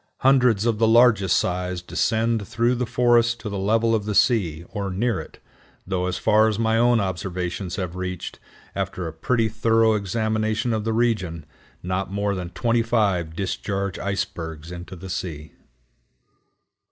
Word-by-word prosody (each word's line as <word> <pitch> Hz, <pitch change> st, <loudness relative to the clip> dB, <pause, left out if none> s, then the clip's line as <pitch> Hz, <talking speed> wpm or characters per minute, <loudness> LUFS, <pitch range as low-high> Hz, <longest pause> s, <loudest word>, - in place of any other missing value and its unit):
Hundreds 125 Hz, -5 st, +4 dB
of 115 Hz, -3 st, +1 dB
the 115 Hz, -, +4 dB
largest 115 Hz, -4 st, +5 dB
size 90 Hz, 0 st, -1 dB
descend 110 Hz, +3 st, 0 dB
through 120 Hz, +1 st, +1 dB
the 125 Hz, -1 st, -2 dB
forests 120 Hz, 0 st, +3 dB
to 110 Hz, -2 st, -7 dB
the 100 Hz, -1 st, -4 dB
level 115 Hz, +3 st, +2 dB
of 105 Hz, -2 st, 0 dB
the 105 Hz, -1 st, -2 dB
sea, 85 Hz, -11 st, +2 dB
or 100 Hz, -2 st, -4 dB
near 115 Hz, +6 st, 0 dB
it, -, -, -10 dB, 0.5 s
though 90 Hz, -1 st, -1 dB
as 90 Hz, -, -2 dB
far 110 Hz, 0 st, +4 dB
as 110 Hz, -2 st, -1 dB
my 110 Hz, 0 st, +1 dB
own 120 Hz, 0 st, +4 dB
observations 90 Hz, -1 st, -3 dB
have 90 Hz, -2 st, -4 dB
reached, 90 Hz, -1 st, -5 dB, 0.4 s
after 95 Hz, -2 st, -3 dB
a 80 Hz, -, -6 dB
pretty 115 Hz, +8 st, 0 dB
thorough 110 Hz, 0 st, +2 dB
examination 110 Hz, +2 st, -1 dB
of 110 Hz, -1 st, -2 dB
the 115 Hz, -, 0 dB
region, 105 Hz, -9 st, 0 dB, 0.4 s
not 95 Hz, +1 st, -2 dB
more 100 Hz, 0 st, -1 dB
than 90 Hz, -2 st, -4 dB
twenty 115 Hz, +4 st, +1 dB
five 100 Hz, -8 st, 0 dB
discharge 100 Hz, +1 st, -3 dB
icebergs 80 Hz, -5 st, -4 dB
into 90 Hz, +1 st, -8 dB
the 95 Hz, +2 st, -9 dB
sea. 80 Hz, -5 st, -5 dB
105 Hz, 160 wpm, -23 LUFS, 90-115 Hz, 0.5 s, largest